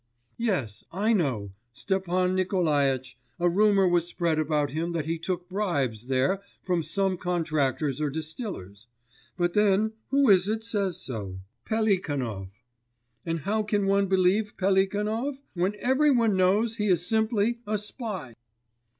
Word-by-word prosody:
'Yes. 180 - -2
I 210 +6 +1
know, 125 - -1 0.2
Stepan 185 +4 0
Nikolaitch, 145 -9 +1 0.2
a 175 - +3
rumour 195 +1 +4
was 175 -1 +2
spread 170 -3 0
about 150 -2 0
him 165 +3 -2
that 160 -3 -2
he 165 +1 -2
took 180 +1 -3
bribes 140 - -1
there 135 +9 +1 0.2
from 180 -2 0
some 190 +2 0
contractors 155 -5 -1
or 150 - +1
distillers. 155 - -6 0.5
But 175 -1 +1
then 210 +1 +3
who 275 0 +3
is 185 -1 +4
it 220 +1 -1
says 200 -6 -1
so? 100 -7 -6 0.2
Pelikanov! 145 - -1 0.8
And 165 -1 -1
how 215 +7 0
can 205 -1 0
one 195 0 +2
believe 190 +3 +2
Pelikanov, 210 +7 0
when 185 +3 0
every 265 +7 +2
one 230 -6 +3
knows 205 +5 +2
he 210 -1 0
is 180 -3 +2
simply 220 +2 +1
a 215 0 0
spy! 205 - -6
185 Hz, 140 wpm, -27 LUFS, 155-210 Hz, 0.8 s, rumour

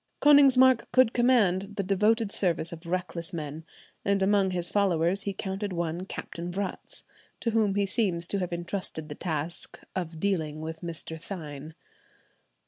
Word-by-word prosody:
Konigsmark 260 -4 +6
could 255 -3 +5
command 210 -6 +3
the 200 - -1
devoted 210 +3 +2
service 175 -3 0
of 170 +1 -10
reckless 170 -1 -3
men, 155 -1 -5 0.4
and 200 -1 +2
among 195 -1 +3
his 175 -2 -1
followers 190 -2 +2
he 200 - -2
counted 195 +1 -3
one 170 +1 -3
Captain 175 -1 -6
Vratz, 195 +1 -4 0.4
to 230 - -1
whom 215 -3 +2
he 200 0 +2
seems 185 -5 0
to 200 - 0
have 180 -2 -2
entrusted 170 -2 -4
the - - -4
task 160 +1 -3 0.2
of 165 -3 -4
dealing 160 -6 -1
with 160 0 -6
Mr. 165 -1 -6
Thynne. 155 -4 -7
185 Hz, 150 wpm, -28 LUFS, 165-200 Hz, 0.4 s, Konigsmark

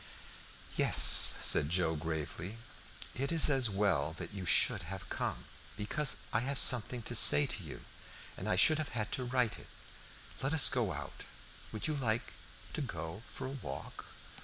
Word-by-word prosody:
"Yes," - - +2
said 70 - +6
Joe, 85 -1 -1
gravely. 80 +5 -7 0.6
"It 135 +4 -4
is 160 -3 +2
as 130 -4 +1
well 95 -7 -1
that - - -9
you 95 -2 -7 0.3
have - - -10
come, - - -5 0.3
because 125 +8 0 0.2
I 105 - +1
have 135 +3 -3
something 125 -1 +2
to 120 - -3
say 145 +5 +7
to 115 - -5
you, 75 - -11 0.5
and - - -7
I - - 0
should 155 +12 +3
have 150 -5 -6
had 110 -1 -4
to 130 - -3
write 125 -2 -2
it. - - -15 0.7
Let 135 +4 -2
us 150 - +6
go 120 -7 -2
out. - - -9 0.5
Would 110 - -6
you 155 - -2
like 120 -4 -4 0.4
to - - -4
go 85 - -8
for 135 - -8
a - - -6
walk?" 70 - -9
110 Hz, 165 wpm, -31 LUFS, 90-135 Hz, 0.7 s, say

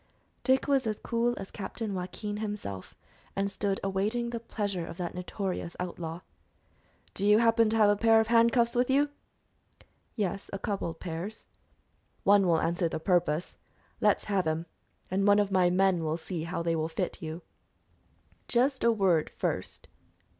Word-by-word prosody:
Dick 260 0 +3
was 270 -4 +2
as 215 -1 -1
cool 235 +1 0
as 195 - -7
Captain 210 +1 -5
Joaquin 195 +3 -4
himself, 205 - -5 0.4
and 195 0 0
stood 200 -2 -1
awaiting 210 +5 0
the 235 - -3
pleasure 205 -5 -3
of 165 - -8
that 175 -2 -4
notorious 180 -1 -4
outlaw. 170 -1 -5 0.9
"Do 195 - -3
you 210 +1 +6
happen 230 -1 +4
to 225 - +1
have 210 -2 +6
a - - +3
pair 225 +1 +5
of 220 - +3
handcuffs 235 +1 +4
with 245 +1 +1
you?" 285 +2 +3 1.1
"Yes, 200 -2 -2
a 195 - -3
couple 195 -2 -2
of 165 - -9
pairs." 175 +5 -5 0.8
"One 200 -1 +5
will 165 -2 +4
answer 170 +1 0
the - - -3
purpose. 170 -2 +1 0.5
Let's - - +3
have 195 -5 0
'em, 160 +1 -1 0.5
and 195 +2 +1
one 205 0 +6
of 205 -1 +1
my 185 -2 +4
men 185 -1 +2
will 155 0 -1
see 165 -1 -5
how 170 0 -3
they 165 -1 +1
will 160 0 -1
fit 180 +2 -3
you." 160 +1 -6 1.0
"Just 260 +3 +1
a 235 - +5
word 190 -7 +2
first." - - -4
195 Hz, 170 wpm, -29 LUFS, 175-225 Hz, 1.1 s, you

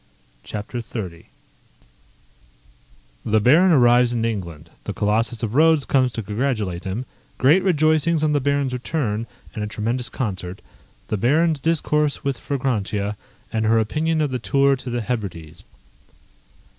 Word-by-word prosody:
CHAPTER 110 +3 -5
XXX 100 -7 -7 2.0
_The 110 -1 +1
Baron 170 - +6
arrives 120 -4 +5
in 115 -1 0
England 85 -8 -5
the - - -3
Colossus 110 +3 0
of 110 -1 -2
Rhodes 155 0 +4
comes 130 -2 +2
to 115 - -4
congratulate 105 -4 -2
him 100 +7 -3 0.3
Great 150 +9 +5
rejoicings 155 -2 +2
on 150 -1 +2
the 145 - +3
Baron's 140 -1 0
return, 120 -4 -2 0.3
and 105 - -4
a - - -2
tremendous 115 +3 -2
concert 95 -7 -5 0.5
The 110 - 0
Baron's 155 - +2
discourse 150 -1 0
with 140 -2 -2
Fragrantia, 105 -7 -2 0.4
and 110 -1 0
her 115 +1 +4
opinion 155 +9 0
of 150 -3 0
the 125 - -2
Tour 140 +3 +3
to 130 - -7
the 120 0 -2
Hebrides. 90 -8 -5
120 Hz, 140 wpm, -22 LUFS, 105-145 Hz, 2.0 s, Baron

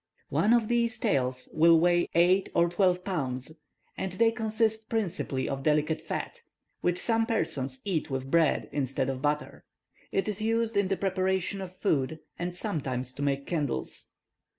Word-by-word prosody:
One 215 - +2
of 235 -2 +4
these 235 -1 +1
tails 125 -1 0
will 165 +1 +6
weigh 175 +1 +3
eight 180 +3 +4
or 170 - +5
twelve 180 0 +2
pounds, 135 -8 -3 0.4
and 190 -1 -3
they 225 +4 +4
consist 220 -1 -1
principally 180 - -1
of 135 0 -3
delicate 150 +2 +1
fat, - - -5 0.4
which 175 0 0
some 225 +2 +1
persons 140 - -2
eat 170 -6 -1
with 135 0 -4
bread 165 -2 +3
instead 135 -1 -1
of 130 -1 -6
butter. 150 +1 -2 0.5
It 195 - 0
is 210 0 -2
used 225 0 0
in 200 -1 +3
the 195 0 0
preparation 190 0 0
of 185 -1 -7
food, 155 -5 0 0.2
and 175 0 -3
sometimes 130 - -3
to 140 - -7
make 140 -1 0
candles." 150 -6 -3
175 Hz, 160 wpm, -28 LUFS, 140-205 Hz, 0.5 s, will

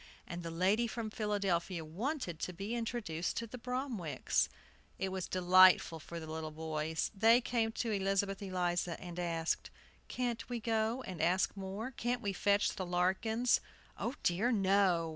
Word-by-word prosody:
And 175 0 -6
the 165 - -5
lady 190 +8 +2
from 225 -1 -4
Philadelphia 195 -6 -1
wanted 190 - -3
to 180 - -3
be 200 +6 -4
introduced 225 -8 -2
to 230 - -1
the 245 +3 -9
Bromwicks. 250 - -1 0.5
It 190 - -1
was 185 -1 -3
delightful 185 -2 +6
for 170 +2 -7
the 160 - -7
little 160 0 -4
boys. 155 0 -2
They 225 +4 +6
came 230 -2 0
to 230 -1 -2
Elizabeth 195 0 0
Eliza, 175 -3 -1
and 175 -1 -7
asked: 165 -2 -1 0.4
"Can't 245 -2 -3
we 240 -1 -2
go 225 +3 0
and 180 -7 -5
ask 180 +5 +2
more? 200 +5 -5
Can't 245 0 -2
we 200 -1 -1
fetch 200 +2 +2
the 190 - -2
Larkins?" 190 +7 +2 0.3
"Oh, 240 +4 -3
dear, 195 +8 +2
no!" 190 -5 +3
195 Hz, 160 wpm, -34 LUFS, 175-225 Hz, 0.5 s, delightful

